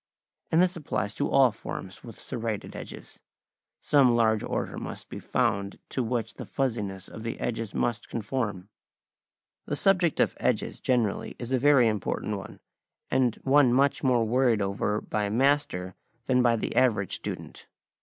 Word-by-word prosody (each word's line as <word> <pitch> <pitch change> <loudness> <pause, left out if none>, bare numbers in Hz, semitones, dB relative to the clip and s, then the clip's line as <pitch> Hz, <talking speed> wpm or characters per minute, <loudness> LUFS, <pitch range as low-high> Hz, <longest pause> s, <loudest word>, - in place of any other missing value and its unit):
And 165 +3 +5
this 185 0 +1
applies 110 - -2
to - - -1
all 135 -3 +5
forms 95 -3 -8
with 115 -3 -11
serrated 115 -3 -4
edges: - - -9 0.6
some 130 -5 +4
large 110 -2 +3
order - - -3
must - - -7
be - - -6
found 100 0 0
to 130 - -1
which 115 -2 -2
the - - -8
fussiness 105 -8 -2
of 110 - -9
the 115 +1 -4
edges 115 -3 -3
must 120 -1 -1
conform. 105 -4 -3 1.0
The 145 - -1
subject 180 -1 +2
of - - +3
edges - - 0
generally 120 -6 0
is 125 +1 -5
a 130 - +3
very 140 -3 +5
important 105 0 -1
one, - - -11 0.5
and 125 -4 +2
one 135 -2 +5
much 140 +2 +2
more 125 -4 +3
worried 120 -1 +2
over 100 +1 -1
by 105 -1 -2
a - - -2
master 115 -7 +1 0.3
than 125 -1 +3
by 120 -1 +4
the 115 - -3
average 105 -7 +2
student. - - -6
115 Hz, 160 wpm, -27 LUFS, 105-130 Hz, 1.0 s, And